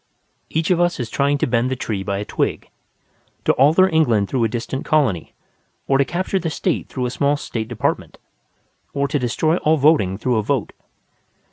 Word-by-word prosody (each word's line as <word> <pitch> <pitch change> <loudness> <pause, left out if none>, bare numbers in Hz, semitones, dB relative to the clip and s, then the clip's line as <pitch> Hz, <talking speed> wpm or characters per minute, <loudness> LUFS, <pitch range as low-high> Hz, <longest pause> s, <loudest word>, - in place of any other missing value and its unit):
Each 160 +2 0
of 175 - +3
us 175 -3 +1
is 115 -3 -4
trying 140 +1 +1
to - - 0
bend 120 0 +1
the 130 - -1
tree 110 -5 -3
by 100 0 -2
a 105 - -4
twig: - - -2 0.7
to - - +4
alter 155 +8 +5
England 120 - +2
through 125 -3 0
a - - +3
distant 120 +4 -4
colony, 130 - 0 0.5
or 135 0 +2
to 140 - +4
capture 185 +6 -1
the 170 - -2
State 165 +2 -2
through 130 -2 -3
a 125 - -2
small 140 +3 +1
State 110 -6 -4
department, 120 -2 -2 0.8
or 140 0 +1
to 145 - -1
destroy 155 +7 +1
all 160 -1 +2
voting 140 - +3
through 120 +2 0
a - - +2
vote. 105 - -2
135 Hz, 195 wpm, -20 LUFS, 115-155 Hz, 0.8 s, alter